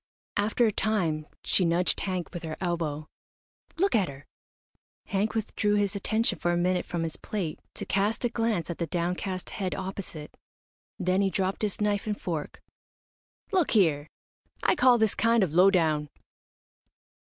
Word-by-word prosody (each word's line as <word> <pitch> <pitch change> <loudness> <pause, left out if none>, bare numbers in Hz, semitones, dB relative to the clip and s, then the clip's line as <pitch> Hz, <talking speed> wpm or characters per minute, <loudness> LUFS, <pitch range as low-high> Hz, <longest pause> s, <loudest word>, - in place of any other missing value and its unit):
After 210 +4 +2
a 220 - +3
time 170 -9 0 0.2
she 190 - +2
nudged 175 +1 +2
Hank 185 -3 -3
with 175 - -5
her 160 -2 -5
elbow. 165 -4 -2 0.7
"Look 390 +4 +2
at 200 -5 +3
her!" 140 +1 -11 0.8
Hank 205 +3 -1
withdrew 210 -1 0
his 205 0 +1
attention 215 -1 0
for 175 - +1
a 175 - +1
minute 180 +1 +1
from 170 -1 -2
his 165 -2 -4
plate 185 -8 -4 0.2
to - - -4
cast 205 +5 0
a - - +2
glance 225 -8 -1
at 170 - -7
the 170 - -1
downcast 180 +3 -2
head 190 -3 -2
opposite. 185 -5 -6 0.6
Then 185 +2 +1
he 195 - +2
dropped 190 0 -1
his 210 -3 -1
knife 205 0 0
and 210 -1 -2
fork. 160 -5 -4 0.9
"Look 370 -5 +2
here! 155 -6 +3 0.6
I - - +4
call 255 -7 +5
this 220 -2 +2
kind 230 -1 +3
of 165 -5 -1
low 180 +3 +7
down." 155 -5 +1
190 Hz, 165 wpm, -28 LUFS, 170-210 Hz, 0.9 s, low